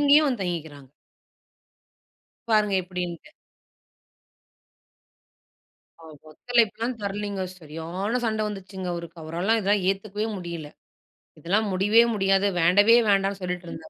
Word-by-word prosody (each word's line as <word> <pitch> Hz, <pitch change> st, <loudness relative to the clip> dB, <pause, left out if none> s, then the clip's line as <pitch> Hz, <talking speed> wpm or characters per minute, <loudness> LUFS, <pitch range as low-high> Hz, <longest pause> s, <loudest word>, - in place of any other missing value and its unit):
இங்கயும் 295 Hz, +1 st, +6 dB
வந்து 250 Hz, -6 st, -1 dB
தங்கிக்குறாங்க. 160 Hz, -6 st, -5 dB, 1.6 s
பாருங்க 210 Hz, -2 st, +3 dB
எப்படின்ட்டு! 180 Hz, -, -6 dB, 2.7 s
அவர் 160 Hz, -2 st, -13 dB
ஒத்தழைப்புலா 230 Hz, +5 st, +1 dB, 0.2 s
தரலங்க. 200 Hz, 0 st, -3 dB, 0.2 s
சரியான 170 Hz, +8 st, -4 dB
சண்ட 220 Hz, -1 st, 0 dB
வந்துச்சுங்க. 190 Hz, -2 st, -7 dB
அவருக்கு 170 Hz, 0 st, -8 dB
அவரால 175 Hz, +8 st, 0 dB
இதெல்லா 200 Hz, +1 st, +3 dB, 0.2 s
ஏத்துக்கவே 205 Hz, +2 st, -3 dB
முடியல, 170 Hz, -4 st, -7 dB, 0.7 s
இதெல்லா 190 Hz, +5 st, +1 dB
முடியவே 205 Hz, +5 st, +5 dB
முடியாது, 195 Hz, -1 st, +2 dB
வேண்டவே 205 Hz, +7 st, +6 dB
வேண்டான்னு 195 Hz, 0 st, +2 dB
சொல்லிட்ருந்தார். 175 Hz, -3 st, -6 dB
195 Hz, 95 wpm, -25 LUFS, 170-210 Hz, 2.7 s, இங்கயும்